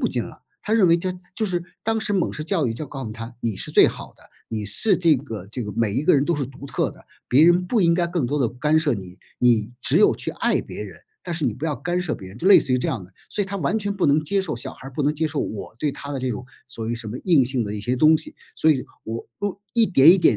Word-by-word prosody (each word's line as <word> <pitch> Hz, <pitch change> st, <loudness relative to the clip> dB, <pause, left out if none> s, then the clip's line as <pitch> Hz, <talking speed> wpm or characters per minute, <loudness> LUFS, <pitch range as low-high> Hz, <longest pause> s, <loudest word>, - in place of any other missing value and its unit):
不 -, -, +1 dB
进 -, -, -1 dB
了， -, -, -13 dB, 0.2 s
她 215 Hz, -, -3 dB
认 215 Hz, -5 st, +4 dB
为 165 Hz, -, +5 dB
这 185 Hz, +2 st, -2 dB, 0.3 s
就 220 Hz, -, 0 dB
是 175 Hz, -3 st, -1 dB, 0.2 s
当 225 Hz, 0 st, 0 dB
时 210 Hz, -1 st, -1 dB
美 185 Hz, -4 st, 0 dB
式 150 Hz, -, -5 dB
教 160 Hz, -2 st, 0 dB
育 115 Hz, -, -2 dB
就 150 Hz, +4 st, -6 dB
告 135 Hz, -2 st, -6 dB
诉 110 Hz, -, -6 dB
她 115 Hz, +1 st, -9 dB
你 115 Hz, -3 st, -2 dB
是 -, -, -3 dB
最 -, -, +6 dB
好 -, -, -6 dB
的， -, -, -21 dB, 0.2 s
你 110 Hz, -2 st, -4 dB
是 105 Hz, -, +7 dB
这 170 Hz, -3 st, +4 dB
个 115 Hz, -8 st, -6 dB
这 115 Hz, +4 st, -5 dB
个 105 Hz, -, -5 dB
每 115 Hz, -3 st, 0 dB
一 130 Hz, -, 0 dB
个 -, -, +4 dB
人 140 Hz, 0 st, +3 dB
都 170 Hz, -, 0 dB
是 145 Hz, -2 st, -1 dB
独 135 Hz, +2 st, -10 dB
特 135 Hz, -, -1 dB
的， -, -, -17 dB, 0.2 s
别 140 Hz, +5 st, +5 dB
人 175 Hz, +2 st, +4 dB
不 230 Hz, -4 st, +2 dB
应 170 Hz, -2 st, +4 dB
该 175 Hz, 0 st, +1 dB
更 170 Hz, -7 st, -1 dB
多 145 Hz, +4 st, -1 dB
地 120 Hz, -, +2 dB
干 150 Hz, +7 st, 0 dB
涉 155 Hz, -4 st, +2 dB
你， 95 Hz, -3 st, -10 dB, 0.2 s
你 115 Hz, -3 st, +2 dB
只 -, -, +3 dB
有 -, -, +5 dB
去 -, -, -4 dB
爱 -, -, 0 dB
别 -, -, -8 dB
人， 95 Hz, -5 st, -9 dB, 0.3 s
但 175 Hz, -, -4 dB
是 160 Hz, -2 st, -2 dB
你 120 Hz, -, 0 dB
不 135 Hz, -, -7 dB
要 150 Hz, -3 st, 0 dB
干 175 Hz, +3 st, -2 dB
涉 180 Hz, -4 st, -2 dB
别 95 Hz, -, -10 dB
人， 95 Hz, -, -12 dB
就 175 Hz, -, -3 dB
类 200 Hz, -, +9 dB
似 130 Hz, -, -1 dB
于 125 Hz, -, +3 dB
这 -, -, -2 dB
样 115 Hz, -7 st, -2 dB
的， 90 Hz, -, -19 dB, 0.2 s
所 205 Hz, -, -1 dB
以 -, -, -3 dB
她 200 Hz, 0 st, -4 dB
完 175 Hz, +4 st, 0 dB
全 205 Hz, -1 st, -2 dB
不 190 Hz, -5 st, +1 dB
能 145 Hz, +2 st, +3 dB
接 195 Hz, +6 st, +1 dB
受 165 Hz, -5 st, -3 dB
小 130 Hz, -, -5 dB
孩 135 Hz, -, -12 dB
儿 -, -, -14 dB
不 145 Hz, -, -2 dB
能 145 Hz, +2 st, +2 dB
接 160 Hz, +2 st, 0 dB
受 155 Hz, -1 st, -2 dB
我 110 Hz, 0 st, -5 dB
对 150 Hz, -, 0 dB
她 145 Hz, +1 st, -8 dB
的 135 Hz, -, -3 dB
这 130 Hz, 0 st, -1 dB
种 120 Hz, -, -5 dB, 0.2 s
所 110 Hz, -1 st, -6 dB
谓 120 Hz, -, -1 dB
什 115 Hz, -2 st, -6 dB
么 110 Hz, -, -5 dB
硬 165 Hz, -7 st, +5 dB
性 125 Hz, -1 st, 0 dB
的 105 Hz, 0 st, -4 dB
一 105 Hz, -, -4 dB
些 125 Hz, +4 st, -1 dB
东 155 Hz, +4 st, +5 dB
西。 155 Hz, -, -5 dB, 0.2 s
所 160 Hz, -, +4 dB
以 135 Hz, -4 st, +1 dB, 0.2 s
我 115 Hz, +1 st, -5 dB
我 200 Hz, -1 st, -4 dB
一 230 Hz, -, +5 dB
点 155 Hz, -3 st, +7 dB
一 185 Hz, -, +7 dB
点 -, -, +4 dB
145 Hz, 335 characters per minute, -22 LUFS, 115-175 Hz, 0.3 s, 类